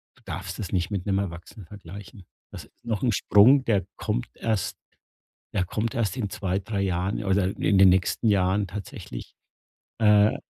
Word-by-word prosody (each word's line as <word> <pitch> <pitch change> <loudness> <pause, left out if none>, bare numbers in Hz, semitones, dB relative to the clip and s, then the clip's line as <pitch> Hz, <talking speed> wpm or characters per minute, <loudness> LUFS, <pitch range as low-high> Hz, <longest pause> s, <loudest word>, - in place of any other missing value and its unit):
du - - -25
darfst - - -6
das 100 - -5
nicht 90 -2 0
mit 95 -3 -3
'nem 95 -1 +1
Erwachsenen 90 +1 -7
vergleichen. 100 +2 -11 0.3
Das - - -9
ist - - -30
noch 110 -1 -2
'n 125 - +3
Sprung, 115 +7 +5
der 100 -5 +1
kommt - - -2
erst 110 -4 -2 0.8
der 95 - 0
kommt 110 +5 -3
erst 115 0 -1
in 110 -6 -2
2, 95 -1 -2
3 100 -1 -3
Jahren 95 +3 -1
oder 95 -1 +2
in 100 - +2
den 95 0 +8
nächsten 95 +5 +2
Jahren 100 0 +2
tatsächlich, 95 -10 -8 0.6
äh 105 -1 +5
100 Hz, 170 wpm, -25 LUFS, 95-105 Hz, 0.8 s, den